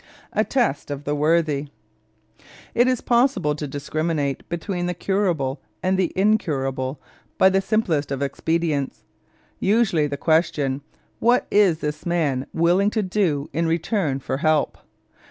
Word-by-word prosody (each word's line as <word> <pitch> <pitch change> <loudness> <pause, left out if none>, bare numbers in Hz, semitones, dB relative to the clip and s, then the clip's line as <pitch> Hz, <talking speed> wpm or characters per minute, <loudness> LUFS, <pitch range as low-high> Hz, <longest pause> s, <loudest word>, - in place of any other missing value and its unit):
A - - +2
TEST 240 - 0
OF 145 0 -5
THE 145 - -1
WORTHY 150 -1 +1 1.1
It 240 +2 +4
is 255 -2 +1
possible 235 - +2
to 150 0 -5
discriminate 145 0 -2
between 175 +1 -3
the 180 - -2
curable 170 -9 -1 0.2
and 190 +1 +2
the 185 -2 +1
incurable 140 -10 0 0.4
by 190 - +6
the 190 0 +2
simplest 175 -9 0
of 135 0 -1
expedients. 155 -1 -1 0.6
Usually 195 -7 +2
the 140 -1 -4
question, 145 -3 +1 0.4
What 240 +2 +3
is 190 -6 +4
this 150 0 -3
man 150 -7 0
willing 175 +5 +3
to 215 0 -1
do 180 -7 0
in 165 +3 0
return 165 - 0
for 130 -1 -3
help? 155 0 +1
165 Hz, 135 wpm, -23 LUFS, 145-190 Hz, 1.1 s, by